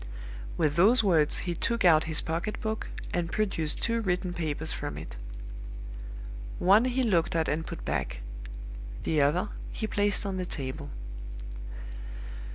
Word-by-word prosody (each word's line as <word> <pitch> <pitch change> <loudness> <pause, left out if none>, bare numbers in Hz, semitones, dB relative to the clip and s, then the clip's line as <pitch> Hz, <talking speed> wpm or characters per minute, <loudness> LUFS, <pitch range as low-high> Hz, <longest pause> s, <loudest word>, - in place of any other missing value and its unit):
"With 150 +1 +2
those 220 +7 +7
words 160 -7 +5
he 175 - 0
took 230 +5 +1
out 160 -3 +7
his 160 -1 +5
pocket 170 +6 -2
book, 220 0 -2 0.3
and 170 -2 0
produced 185 -8 0
two 230 0 +2
written 180 -3 0
papers 160 -2 -1
from 145 0 -4
it. - - -7 1.4
One 200 +6 +6
he 255 +1 +2
looked 175 -8 +3
at 160 -1 +2
and 160 +2 0
put 170 - -6
back. 65 -4 -1 0.8
The 155 -2 +3
other 165 +8 +3 0.2
he 220 - -2
placed 205 -1 +2
on 195 -1 -1
the 185 - -1
table. 130 -6 -3
175 Hz, 145 wpm, -29 LUFS, 155-205 Hz, 1.4 s, those